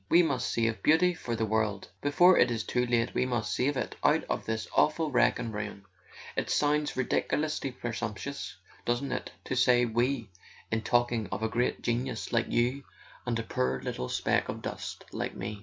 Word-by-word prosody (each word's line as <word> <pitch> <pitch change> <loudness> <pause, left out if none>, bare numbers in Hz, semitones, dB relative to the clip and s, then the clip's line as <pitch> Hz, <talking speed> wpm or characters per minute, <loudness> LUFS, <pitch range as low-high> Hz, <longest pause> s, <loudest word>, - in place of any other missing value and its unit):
We 175 +1 +6
must 140 -6 0
save 115 -1 0
Beauty 175 +4 +4
for 120 -8 -4
the 110 0 0
world; 110 -2 0
before 175 +6 +6
it - - +5
is 115 -2 -1
too 125 0 0
late 120 0 +1
we 125 - +1
must 120 -3 -1
save 140 +2 +1
it - - -3
out - - +4
of - - -3
this 110 0 -2
awful 155 0 +3
wreck 120 -1 +4
and 115 -1 -4
ruin. 105 -1 -5 0.5
It - - -1
sounds 150 -1 +1
ridiculously 145 +2 0
presump¬ 115 -3 -4
tuous, 140 +6 -5 0.3
doesn't 120 +3 -1
it, - - -3
to - - -3
say 125 -1 +4
'we' 120 -1 0 0.4
in 110 0 +1
talking 120 -2 +1
of 110 - -3
a - - +2
great 120 +2 0
genius 120 0 -2
like 115 -1 +2
you 125 +4 +1 0.4
and 120 -1 +1
a 115 - -2
poor 65 - -1
little 65 - -3
speck - - +1
of - - -5
dust - - -6
like - - -3
me 105 -1 -5
120 Hz, 190 wpm, -29 LUFS, 110-135 Hz, 0.5 s, We